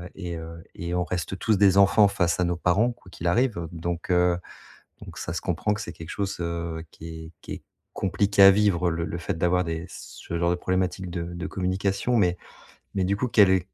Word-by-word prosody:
et 85 -3 -5
heu, 80 0 -9
et 85 +1 -4
on 90 - +1
reste 90 +1 -3
tous 110 -2 +2
des 100 -1 +5
enfants 100 +1 +6
face 85 -3 0
à - - +3
nos 85 0 0
parents, 95 +8 +2
quoi 95 - -18
qu'il 85 - -8
arrive, 120 +5 +2
heu, 85 -1 -4
donc 85 +2 -4
heu, 90 0 +3 0.6
donc - - -10
ça 80 - -4
se 85 - -3
comprend 100 +4 0
que 105 - -4
c'est - - -6
quelque 80 - -10
chose, 100 -1 -3
heu, 85 -1 -3
qui 80 - -10 0.2
est 80 - -12
qui - - -11
est - - -9 0.3
compliqué 100 +1 +2
à 95 - +11
vivre. 95 -4 +2
Heu, - - -1
le 85 0 -2
le 85 - -4
fait 85 - -3
d'avoir 90 +1 +2
des 80 0 -3
ce 85 - -7
genre 85 0 +2
de - - +2
problématique 95 0 -1
de 85 -1 -3
de 85 +2 -5
communication 95 +6 -1
mais 90 -3 +2 0.6
mais 95 - +1
du 100 +2 0
coup, 125 - 0
quelles, 100 -4 +6
heu, 95 - +4
90 Hz, 230 wpm, -25 LUFS, 85-100 Hz, 0.6 s, à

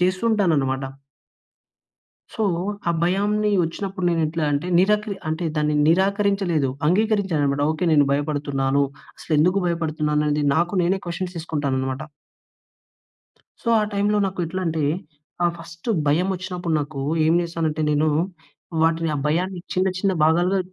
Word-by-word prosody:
చేస్తూ 185 0 +1
ఉంటాను 200 -6 +2
అన్నమాట. 135 0 -1 1.5
సో 220 - -2 0.5
ఆ - - +4
భయాన్ని 205 +4 +1
వచ్చినప్పుడు 185 +3 -4
నేను 165 -1 +1
ఎట్లా 160 +1 -2 0.3
నిరకరి 210 +1 +2
అంటే 160 +3 -2
దాన్ని 150 0 +1
నిరాకరించలేదు, 190 -5 +2 0.2
అంగీకరించాను 200 -3 +2
అన్నమాట. 140 0 0
ఓకె 170 +3 -3
నేను 145 -2 +5
భయపడుతున్నాను. 140 -2 0 0.4
అసలు - - -6
ఎందుకు 180 +6 +3
భయపడుతున్నాను 155 -3 0
అనేది 150 0 +1
నాకు 175 +3 +1
నేనే 185 +3 +1
క్వెషన్స్ 175 +1 -4
తీసుకుంటాను 145 -5 -2
అన్నమాట. 130 +2 -3 1.6
సో 235 - -3
ఆ - - +1
టైమ్‌లో 205 +1 +1
నాకు 185 -1 -4
ఎట్లా 185 +3 -4
అంటే 160 -1 -1 0.6
ఆహ్, 175 - +2
ఫస్ట్ 170 +4 -10 0.2
భయం 165 +6 +2
వచ్చినప్పుడు 180 -2 -3
నాకు 145 -1 -5 0.2
ఏమి 165 +2 +3
చేశాను 165 -1 -2
అంటే 155 +1 -3
నేను 150 +1 +2 0.7
వాటిని 165 0 +2
ఆ - - -1
భయాన్ని 180 +4 -1
చిన్న 185 +1 +2
చిన్న 195 0 +1
భాగాలుగా 175 +4 +3
170 Hz, 140 wpm, -22 LUFS, 150-190 Hz, 1.6 s, నేను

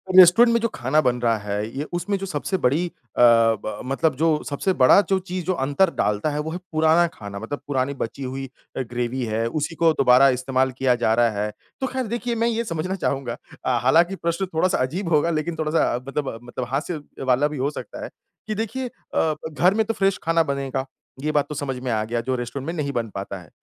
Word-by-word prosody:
Restaurant 185 +7 +8
में 235 - +3
जो 230 - +2
खाना 130 +5 +1
बन 125 -2 +1
रहा 115 -2 +2
है 105 +1 -3
ये 145 - -1
उसमें 195 +3 -1
जो 195 - -5
सबसे 185 +2 -2
बड़ी 155 +8 +2
अ, - - -11 0.3
ब 115 -3 +4
मतलब 135 +2 +1
जो 160 +4 +1 0.2
सबसे 185 +7 0
बड़ा 130 +9 +8
जो 195 - +3
चीज़ 185 0 -3
अंतर 145 +4 +2
डालता 105 +7 0
है 150 0 -2
वो 160 +1 -3
है 175 - -3
पुराना 160 +2 +4
खाना 100 -1 -8
मतलब 130 +7 -5
पुरानी 135 0 0
बची 135 +1 -5
हुई 135 +1 -4 0.3
अ, - - 0
ग्रैवी 125 +1 -3
है, 110 +1 -1
उसी 155 +5 -3
को 165 -1 +4
दोबारा 130 +1 +6
इस्तेमाल 130 +1 +1
किया 130 -2 +3
जा 115 -2 +1
रहा 120 0 +4
है। 105 - -2 0.3
तो 265 - +1
ख़ैर 260 -3 -3
देखिए 235 +1 -2
मैं 230 +1 +1
ये 230 0 0
समझना 180 0 -3
चाहूँगा 135 -8 -2 0.3
अ, 125 -2 +2
हालाँकि 170 +8 +4
प्रश्न 170 +2 -1
थोड़ा-सा 175 +3 +2
अजीब 165 +8 -2
होगा 155 +3 +3
लेकिन 160 +1 -1
थोड़ा-सा 155 -3 +1
अ, - - -2
मतलब 135 -5 -3
मतलब 120 +1 -5
हास्य 150 +3 -2 0.2
वाला 130 +3 +3
भी 150 -1 -6
हो 135 +3 0
सकता - - -8
है - - -5 0.4
कि 215 - -2
देखिए 230 +4 -3
अ, 160 -9 -2 0.2
घर 175 +7 +3
में 220 0 +1
तो 225 - -1
फ्रेश 195 -2 +1
खाना 165 0 +3
बनेगा, 135 -2 -2 0.4
ये 155 +1 0
बात 145 -2 +1
तो 150 - -5
समझ 140 -3 -3
में 125 - -1
आ 110 -1 +1
गया 115 +2 -2
जो 130 +2 -1
रेस्टोरेंट 125 +3 -5
में 165 - -2
नहीं 145 -4 -2
बन 115 -2 -2
पाता 100 0 -5
है। 85 - -17
145 Hz, 225 wpm, -23 LUFS, 125-175 Hz, 0.4 s, रेस्टोरेंट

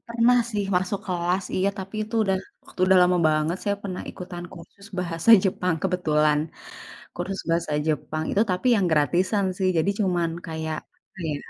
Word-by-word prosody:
pernah 235 +1 +3
sih 205 -3 -1
masuk 185 +2 -1
kelas, 180 +1 0
iya, 190 +1 +2
tapi 195 +2 -7
itu 225 +2 -9
udah 195 -1 +1 0.5
udah 190 0 +5
lama 180 0 +4
banget 155 +3 +1
saya 205 0 +1
pernah 185 -2 -5
ikutan 175 -1 -8
kursus 190 +3 -13
bahasa 170 +4 0
Jepang 180 -2 0
kebetulan. 155 -5 +2 0.8
Kursus 190 +2 -4
bahasa 165 -2 0
Jepang 155 0 -1
itu 205 - +2
tapi 185 +7 -1
yang 195 -3 +2
gratisan 180 +7 +2
sih. 190 -1 +1
Jadi 160 +5 +2
cuman 175 -3 +1 0.2
kayak, 160 -2 -4 0.3
apa - - -17
ya, 150 - -1
180 Hz, 160 wpm, -24 LUFS, 165-195 Hz, 0.8 s, udah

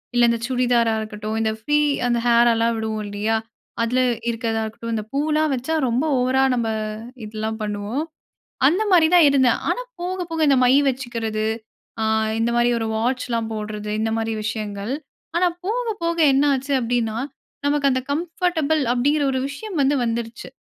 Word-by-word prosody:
இல்ல 240 - +4
இந்த 235 0 0
சுடிதாரா 245 -3 +2
இருக்கட்டும், 215 0 -5
இந்த 220 0 +1
ஃப்ரீ 295 +7 +1 0.3
அந்த 240 -1 +1
ஹேர் 235 0 +5
எல்லாம் 230 +1 +1
விடுவோம் 220 -1 -3
இல்லையா? 210 +2 0 0.5
அதுல 245 +2 +1 0.3
இருக்கிறதா 225 -1 -1
இருக்கட்டும். 230 +1 -6
இந்த 215 - -2
பூலாம் 305 +2 +1
வச்சா 260 +6 -3 0.2
ரொம்ப 245 +6 +1
ஓவரா 260 +1 +2
நம்ம, 235 -2 -1 0.6
இதெல்லாம் 220 +1 -4
பண்ணுவோம். 210 +7 -3 0.6
அந்த 360 +9 +2
மாதிரி 335 -3 +6
தான் 345 -3 +7
இருந்தேன். 260 -4 +3
ஆனா - - 0 0.2
போக, 365 +1 -2
போக 325 - -2
இந்த 275 - +5
மை 250 - +5 0.2
வச்சுக்கிறது. 230 -4 -3 0.6
அ - - +1 0.4
இந்த 230 +1 +1
மாதிரி 240 0 +3
ஒரு 225 - -2
வாட்ச்லாம் 235 -1 -1
போடுறது, 210 -1 -5
இந்த 220 0 0
மாதிரி 225 0 -1
விஷயங்கள். 215 0 -3 0.4
ஆனா 360 +1 +4 0.2
போக, 485 +4 -1 0.2
போக 335 0 0 0.2
என்ன 275 +2 +3
ஆச்சு 270 +2 -3
அப்படின்னா, 230 -2 -1 0.5
நமக்கு 285 -1 +2
அந்த 260 0 0
கம்ஃபர்டபுள் 320 -1 0
அப்படிங்குற 285 +4 +2
ஒரு 260 - 0
விஷயம் 385 +8 -7
வந்து 275 +1 +3
வந்துருச்சு. 230 0 -3
240 Hz, 160 wpm, -22 LUFS, 225-285 Hz, 0.6 s, தான்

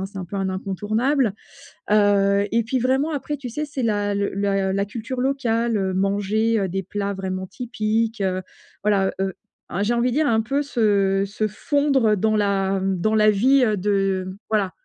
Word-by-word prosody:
hein, 190 - -3
c'est 195 0 -10
un 185 - -4
peu 185 - -10
un 195 -1 -1
incontournable. 215 +7 0 0.6
Heu, 200 -1 +4
et 230 +1 +1
puis 255 +4 -1
vraiment, 265 +5 +1
après, 295 0 -3
tu 260 -4 -7
sais, 300 +6 -3
c'est 280 -3 -4
la 205 -2 0
le 200 -1 -1
la 195 -1 0
la 200 +1 0
culture 230 +4 -6
locale 235 -3 0
heu, 190 -2 0
manger, 205 +4 +1
heu, 195 - 0
des 195 +2 -3
plats 200 +2 -3
vraiment 190 -1 -4
typiques. 225 0 -2
Heu, 185 -1 0 0.4
voilà, 200 -2 +2
heu, 190 -1 -1 0.3
a 195 +4 -2
j'ai 235 +3 +1
envie 240 +1 +1
de - - -2
dire, 305 -1 +2
un 220 -1 +3
peu 275 +6 -1
se 200 -7 +1
se 210 +2 -2
fondre 270 -1 +2
dans 215 +2 +1
la 195 -1 +1
dans 195 +3 0
la 215 0 +5
vie, 255 +6 +4
heu, 215 - +1
de 195 -1 -1
voilà. 205 -4 +1
205 Hz, 195 wpm, -22 LUFS, 195-235 Hz, 0.6 s, la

